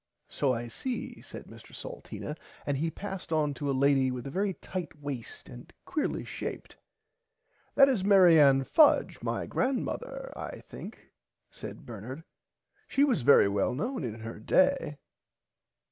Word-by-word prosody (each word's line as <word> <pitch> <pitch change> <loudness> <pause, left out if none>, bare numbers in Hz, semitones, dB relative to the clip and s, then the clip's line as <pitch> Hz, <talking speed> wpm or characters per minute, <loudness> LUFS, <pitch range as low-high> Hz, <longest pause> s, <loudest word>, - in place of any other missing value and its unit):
So 140 - 0
I 120 -1 -2
see 245 - -5
said - - -10
Mr - - -14
Salteena 325 - -7 0.3
and 145 - 0
he 160 +4 0
passed 195 0 -7
on 150 -2 +1
to 140 +2 -4
a - - +2
lady 135 0 +3
with 125 -1 -5
a 135 - -5
very 195 +3 -1
tight 175 -1 -6
waist 140 -5 -7
and 120 0 -12
quearly 315 -5 -2
shaped. - - -6 1.0
That 275 -1 +8
is 250 -9 +1
Mary 185 -5 +7
Ann 135 -2 +6
Fudge 300 - +4
my - - -2
grandmother - - -2
I - - -7
think - - -11 0.4
said - - -9
Bernard 120 +7 -8 0.6
she 275 - +2
was 255 - +2
very 120 -3 +6
well 100 +4 0
known 240 - -2
in 110 -2 -5
her 110 0 -7
day. 275 - +2
150 Hz, 150 wpm, -29 LUFS, -, 1.0 s, That